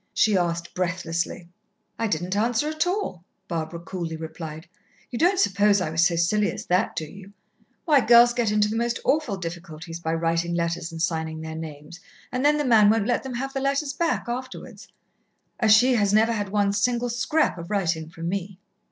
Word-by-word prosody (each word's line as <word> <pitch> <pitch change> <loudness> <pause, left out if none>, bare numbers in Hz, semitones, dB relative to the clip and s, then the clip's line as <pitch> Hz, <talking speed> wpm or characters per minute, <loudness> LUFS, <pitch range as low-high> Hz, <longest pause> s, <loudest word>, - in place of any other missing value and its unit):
she 215 -2 +3
asked 170 -2 -1
breathlessly. 175 -1 -2 0.5
"I 225 - +1
didn't 180 0 -2
answer 230 +6 +1
at 310 +2 -1
all," 355 - -2 0.2
Barbara 165 -1 -4
coolly 170 -2 -5
replied. 160 0 -7 0.5
"You 240 - -4
don't 360 +4 +3
suppose 200 - +3
I 170 -4 -2
was 165 +1 +2
so 175 -1 +3
silly 205 +5 +2
as - - -7
that, 180 +4 +1
do 160 - -3
you? 195 +5 -13 0.5
Why, 295 -5 +5
girls 240 +1 +6
get 240 -3 0
into 210 0 +2
the 215 - -3
most 235 +1 -1
awful 275 -9 +1
difficulties 165 -1 -7
by 160 -1 -2
writing 165 +1 0
letters 170 0 -2
and 165 - -7
signing 160 -1 -2
their 160 0 -6
names, 160 +1 -8 0.3
and 255 +1 -2
then 295 +1 +4
the 295 - -1
man 220 -4 +6
won't 220 -1 +2
let 245 - +1
them 265 -2 -6
have 270 +2 -4
the 270 - -2
letters 275 +1 0
back 330 -3 -1
afterwards. 255 +2 -7 0.7
Achille 235 +3 +5
has 205 -1 +2
never 220 +2 +4
had 205 -3 -2
one 200 0 +1
single 240 +4 0
scrap 260 - 0
of 170 - -8
writing 165 -6 -1
from 165 0 -7
me." 195 +1 -4
200 Hz, 190 wpm, -24 LUFS, 170-240 Hz, 0.7 s, girls